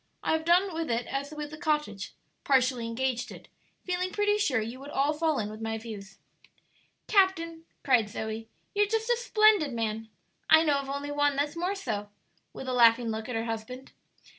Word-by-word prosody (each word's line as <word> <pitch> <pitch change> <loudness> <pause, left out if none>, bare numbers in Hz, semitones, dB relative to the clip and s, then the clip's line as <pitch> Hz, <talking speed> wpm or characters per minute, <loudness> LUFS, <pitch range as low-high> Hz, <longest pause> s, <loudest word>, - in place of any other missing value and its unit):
I - - 0
have 320 0 0
done 360 +2 +4
with 325 0 -3
it 235 0 0
as 275 +1 -3
with 300 -1 -6
the 305 - -9
cottage 300 - -1 0.3
partially 255 -3 +2
engaged 245 +1 -2
it - - -12 0.4
feeling 365 0 -1
pretty 415 +1 +1
sure 275 - +2
you 230 +4 -5
would 280 +1 -9
all 285 +1 +1
fall 310 -1 0
in 210 - -1
with 215 +1 -8
my 225 0 -2
views." 215 -3 -9 0.9
"Captain," 335 -5 +2 0.2
cried 240 -6 +3
Zoe, 220 +1 -5 0.2
"you're 415 0 +3
just 450 +2 0
a - - +5
splendid 430 - +3
man! 225 -1 -3 0.4
I 315 - +8
know 290 -3 +2
of 275 -1 -6
only 280 +1 -3
one 290 -1 +2
that's 290 +2 -1
more 360 +4 -1
so," 210 - -4 0.4
with 265 - -8
a 255 - -1
laughing 235 -1 +5
look 220 +1 -4
at 250 - -3
her 225 0 -1
husband. 230 +4 -6
275 Hz, 190 wpm, -28 LUFS, 230-330 Hz, 0.9 s, I